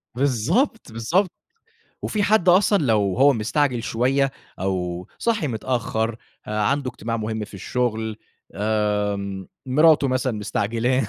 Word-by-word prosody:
بالضبط، 140 - 0
بالضبط 165 - +1 0.7
وفي 210 - -1
حد 205 -3 +3
أصلًا 195 +3 +5
لو 105 -5 +2
هو 140 +1 +6
مستعجل 125 +2 0
شوية، 135 +4 +1 0.3
أو 90 -2 -2
صاحي 225 -9 0
متأخر، 115 -2 -1 0.3
عنده 125 +6 0
اجتماع 115 -1 -4
مهم 110 -1 -3
في 100 - -14
الشغل 110 0 -2 0.8
آآ، 100 -2 -2 0.2
مراته 150 +1 +5
مثلًا 130 -1 0
مستعجلاه، 115 +4 0
120 Hz, 115 wpm, -23 LUFS, 105-140 Hz, 0.8 s, هو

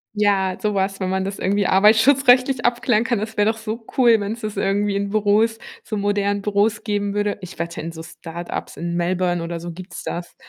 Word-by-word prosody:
Ja, 195 -3 +1
sowas, 195 -2 -1
wenn 185 -1 -2
man 190 0 0
das 195 +1 -5
irgendwie 200 +1 +1
arbeitsschutzrechtlich 250 +5 +4
abklären 240 -1 +2
kann, 240 -4 0
das 220 +1 -6
wäre 210 +1 +3
doch 225 - -2
so 225 +1 -6
cool, 235 -4 +5
wenn's 210 +3 -4
das 215 -2 -5
irgendwie 200 +1 0
in 200 0 -2
Büros, 215 +2 +2 0.3
so 215 - -5
modernen 205 0 0
Büros 210 +2 +1
geben 205 -2 -1
würde. 205 0 -1
Ich 185 -2 -10
wette, 170 0 -4
in 165 +1 -5
so 160 0 -8
Start-ups 170 +2 -7
in 170 0 -4
Melbourne 175 0 0
oder 170 0 -5
so 175 0 -6
gibt's 185 +3 -9
das. 175 0 -5
205 Hz, 200 wpm, -21 LUFS, 185-220 Hz, 0.3 s, cool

